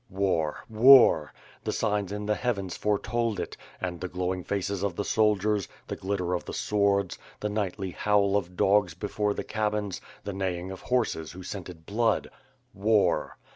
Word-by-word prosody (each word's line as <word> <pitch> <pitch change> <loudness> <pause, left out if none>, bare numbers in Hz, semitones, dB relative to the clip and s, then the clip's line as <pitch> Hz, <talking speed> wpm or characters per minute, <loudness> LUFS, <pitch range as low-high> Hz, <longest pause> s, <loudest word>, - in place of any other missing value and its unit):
War! 90 -6 0
War! 115 - +7 0.3
The - - -1
signs 105 -3 0
in 105 0 -4
the 105 - +2
heavens 100 -6 -2
foretold 110 +1 0
it, - - -4 0.2
and 90 -2 -4
the 95 - -2
glowing 90 0 -2
faces 100 0 -2
of 100 -3 -1
the 100 - -2
soldiery, 105 -3 +2 0.2
the - - -4
glitter 95 -2 -2
of 90 - -1
the - - -7
sw©rds, 100 -2 +1 0.2
the 105 - -2
nightly 100 -2 -2
howl 100 +1 +2
of 90 -3 -2
dogs 95 -4 +3
before 105 +2 -1
the - - -3
cabins, 105 -3 -2 0.2
the 100 - -4
neighing 95 -1 -3
of 95 - -8
horses, 110 -12 -1
who 90 +1 -9
scented 90 -4 -8
blood, 110 +3 +1 0.4
"War." 105 +1 +2
100 Hz, 165 wpm, -28 LUFS, 90-105 Hz, 0.4 s, War